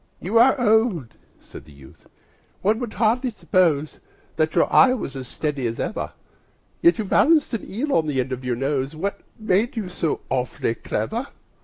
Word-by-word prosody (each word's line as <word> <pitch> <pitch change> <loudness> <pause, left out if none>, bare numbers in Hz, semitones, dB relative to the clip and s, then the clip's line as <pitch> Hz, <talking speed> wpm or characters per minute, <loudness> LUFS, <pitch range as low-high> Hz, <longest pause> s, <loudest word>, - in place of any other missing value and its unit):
"You 215 +6 +1
are 260 +3 +5
old," 220 - +2 0.3
said - - -12
the 75 - -16
youth, 70 -2 -17 0.6
"one 215 +3 +2
would 240 -4 -5
hardly 235 +5 +1
suppose 170 -9 0 0.4
That 155 0 0
your - - +5
eye 255 -1 +6
was 140 - -6
as 130 -2 -6
steady 145 -4 -2
as 115 0 -5
ever; 220 - -3 0.7
Yet 340 -3 +5
you 220 - -2
balanced 305 - +3
an 230 - -4
eel 275 +8 -2
on 160 -2 +2
the 140 -3 -1
end 130 +1 -2
of 130 0 -4
your 125 -1 -1
nose 135 +2 -2
What 195 +6 -3 0.2
made 215 +2 0
you 205 -5 -3
so 165 -3 -2
awfully 125 -3 -1
clever?" 220 - -3
185 Hz, 180 wpm, -23 LUFS, -, 0.7 s, eye